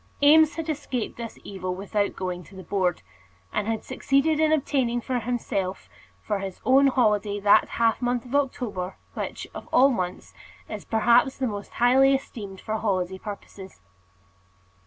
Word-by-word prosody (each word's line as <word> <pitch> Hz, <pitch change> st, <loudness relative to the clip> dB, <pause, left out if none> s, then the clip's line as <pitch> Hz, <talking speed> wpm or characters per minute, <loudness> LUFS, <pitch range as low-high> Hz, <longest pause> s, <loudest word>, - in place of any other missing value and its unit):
Eames 305 Hz, +1 st, +6 dB
had 325 Hz, -1 st, -4 dB
escaped 270 Hz, -6 st, -3 dB
this 235 Hz, -1 st, -7 dB
evil 185 Hz, -2 st, -4 dB
without 200 Hz, +2 st, -1 dB
going 180 Hz, -1 st, -4 dB
to 190 Hz, -, -16 dB
the 190 Hz, -, -9 dB
Board, 180 Hz, -1 st, -1 dB, 0.5 s
and 210 Hz, -, -1 dB
had 225 Hz, -1 st, -2 dB
succeeded 290 Hz, +3 st, +1 dB
in 315 Hz, 0 st, +3 dB
obtaining 265 Hz, -5 st, +1 dB
for 250 Hz, +1 st, -2 dB
himself 215 Hz, -5 st, -3 dB, 0.4 s
for 205 Hz, -, -1 dB
his 190 Hz, -1 st, -6 dB
own 270 Hz, +2 st, +6 dB
holiday 210 Hz, -5 st, +2 dB
that 205 Hz, 0 st, +5 dB, 0.3 s
month 245 Hz, -1 st, -1 dB
of 245 Hz, -, -10 dB
October, 225 Hz, -10 st, -1 dB, 0.2 s
which, -, -, -5 dB
of -, -, -9 dB
all 270 Hz, +2 st, +6 dB
months, 185 Hz, -6 st, -4 dB, 0.3 s
is -, -, -7 dB
perhaps 240 Hz, +4 st, +3 dB
the 265 Hz, -, -1 dB
most 205 Hz, -4 st, -5 dB
highly 265 Hz, +3 st, +5 dB
esteemed 205 Hz, -7 st, -7 dB
for 220 Hz, +2 st, -3 dB
holiday 190 Hz, -3 st, -1 dB
purposes. 200 Hz, -2 st, -9 dB
225 Hz, 155 wpm, -25 LUFS, 195-265 Hz, 0.5 s, Eames